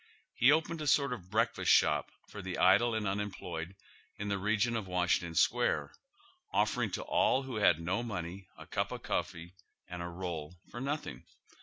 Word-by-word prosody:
lie 125 Hz, -, +7 dB
opened 160 Hz, +2 st, +2 dB
a 150 Hz, -, -3 dB
sort 140 Hz, -2 st, +3 dB
of 95 Hz, -7 st, -9 dB
breakfast 110 Hz, +3 st, +1 dB
shop -, -, +4 dB, 0.2 s
for 105 Hz, -, -8 dB
the 95 Hz, -1 st, -5 dB
idle 100 Hz, +6 st, +4 dB
and 110 Hz, -2 st, -1 dB
unemployed 95 Hz, -3 st, -4 dB, 0.4 s
in 105 Hz, 0 st, -4 dB
the 100 Hz, -, 0 dB
region 105 Hz, +4 st, +1 dB
of 110 Hz, -4 st, -3 dB
Washington 90 Hz, -2 st, 0 dB
Square, 75 Hz, -2 st, +2 dB, 0.6 s
offering -, -, +1 dB
to -, -, -4 dB
all 135 Hz, -, +2 dB
who 130 Hz, -4 st, -5 dB
had 90 Hz, -6 st, +4 dB
no 90 Hz, +6 st, -1 dB
money 95 Hz, -4 st, -5 dB
a -, -, -11 dB
cup -, -, -2 dB
of -, -, -6 dB
coffee 85 Hz, +2 st, -3 dB, 0.3 s
and 90 Hz, -1 st, -6 dB
a 85 Hz, -, -4 dB
roll 85 Hz, -2 st, -5 dB, 0.2 s
for 120 Hz, -, -6 dB
nothing. 140 Hz, -, -4 dB
95 Hz, 175 wpm, -32 LUFS, 85-120 Hz, 0.6 s, lie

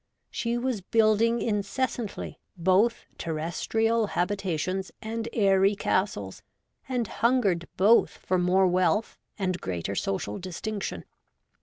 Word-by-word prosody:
She 235 Hz, 0 st, -1 dB
was 240 Hz, -4 st, -1 dB
building 225 Hz, +3 st, +3 dB
incessantly, 220 Hz, +2 st, -2 dB, 0.2 s
both 190 Hz, +7 st, +2 dB
terres 165 Hz, +1 st, -3 dB
trial 225 Hz, 0 st, +2 dB
habitations 185 Hz, -1 st, -1 dB
and 225 Hz, +1 st, -4 dB
airy 195 Hz, -1 st, +3 dB
castles, 145 Hz, -, -1 dB, 0.5 s
and 245 Hz, -4 st, 0 dB
hungered 210 Hz, -9 st, +1 dB
both 215 Hz, +5 st, +5 dB
for 185 Hz, 0 st, -2 dB
more 185 Hz, +2 st, +3 dB
wealth 185 Hz, +3 st, +1 dB, 0.2 s
and 185 Hz, -3 st, -1 dB
greater 90 Hz, +1 st, -3 dB
social 100 Hz, +1 st, -2 dB
distinction. 190 Hz, +3 st, -5 dB
195 Hz, 110 wpm, -27 LUFS, 180-225 Hz, 0.5 s, both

